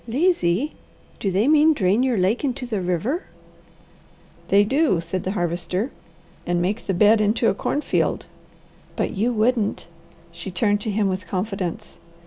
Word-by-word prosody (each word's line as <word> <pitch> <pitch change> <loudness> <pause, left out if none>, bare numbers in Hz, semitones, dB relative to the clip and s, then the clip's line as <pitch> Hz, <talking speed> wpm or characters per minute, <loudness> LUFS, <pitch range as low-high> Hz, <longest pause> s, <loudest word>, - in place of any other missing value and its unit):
"Lazy! 270 - +1 0.5
Do 200 - -1
they 195 +6 +1
mean 310 +1 +5
drain 200 0 +2
your 255 -3 +1
lake 195 +8 +1
into 265 -2 -2
the 215 -5 -2
river?" 180 - -1 1.2
"They 200 +1 +5
do," 265 - +2
said 175 +2 -4
the 185 - -1
Harvester, 180 +7 -1 0.5
"and 175 0 0
make 195 +6 -2
the 195 - +1
bed 215 +3 +5
into 215 +3 +2
a - - +1
cornfield." 290 +8 -1 0.7
"But - - -1
you 220 +5 0
wouldn't?" 225 -1 0 0.5
She 170 +3 -8
turned 205 +3 +1
to 220 - -3
him 205 0 +1
with 185 -2 -3
confidence. 185 -1 -4
205 Hz, 150 wpm, -22 LUFS, 185-245 Hz, 1.2 s, mean